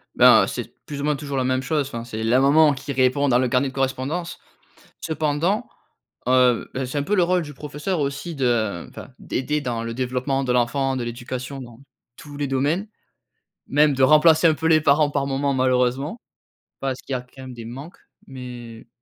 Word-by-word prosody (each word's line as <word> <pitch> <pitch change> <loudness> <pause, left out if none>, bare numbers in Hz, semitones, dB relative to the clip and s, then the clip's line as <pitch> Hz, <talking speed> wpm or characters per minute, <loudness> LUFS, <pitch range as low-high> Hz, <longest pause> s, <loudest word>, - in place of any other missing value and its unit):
Ben, - - +7
c'est - - -6
plus 145 -1 -6
ou - - -4
moins 150 0 +1
toujours 140 0 -5
la 130 - +1
même 130 0 0
chose, 145 -1 -1
enfin 115 -2 -6
c'est 110 -2 -5
la 120 +3 +3
maman 150 +2 +5
qui 140 +1 -6
répond 130 +2 +2
dans 125 -2 +4
le 125 -1 +1
carnet 135 +1 +2
de 130 - -7
correspondance. 135 +6 -2 0.6
Cependant, 160 +8 -1 0.6
heu, 125 -2 +3
bah, 130 0 -2
c'est 135 +3 -3
un - - -1
peu 210 +7 0
le 180 - +4
rôle 180 +1 +2
du 150 -2 -8
professeur 150 +5 -4
aussi 145 +4 -3
de 115 - 0
enfin - - -11
d'aider 150 +3 -2
dans 115 -3 -3
le 115 0 -5
développement 130 +2 -1
de 125 - -1
l'enfant, 130 +2 +1
de 125 - -3
l'éducation, 125 +3 -6
dans 120 -2 -12 0.4
tous 145 -3 -11
les 145 - -1
domaines, 145 +10 0 0.8
même 145 0 +3
de 135 - 0
remplacer 155 +4 +6
un 160 - +3
peu 160 - -3
les 160 -1 +5
parents 145 0 +3
par 140 - -1
moments 140 +1 0
malheureusement. 130 - 0 0.6
Parce 135 -1 -3
qu'il 135 - -6
y - - +1
a - - -6
quand 125 +2 -15
même 130 - -8
des 115 -2 -9
manques, 135 +9 -9 0.3
mais, 120 -3 -9
135 Hz, 200 wpm, -22 LUFS, 125-150 Hz, 0.8 s, Ben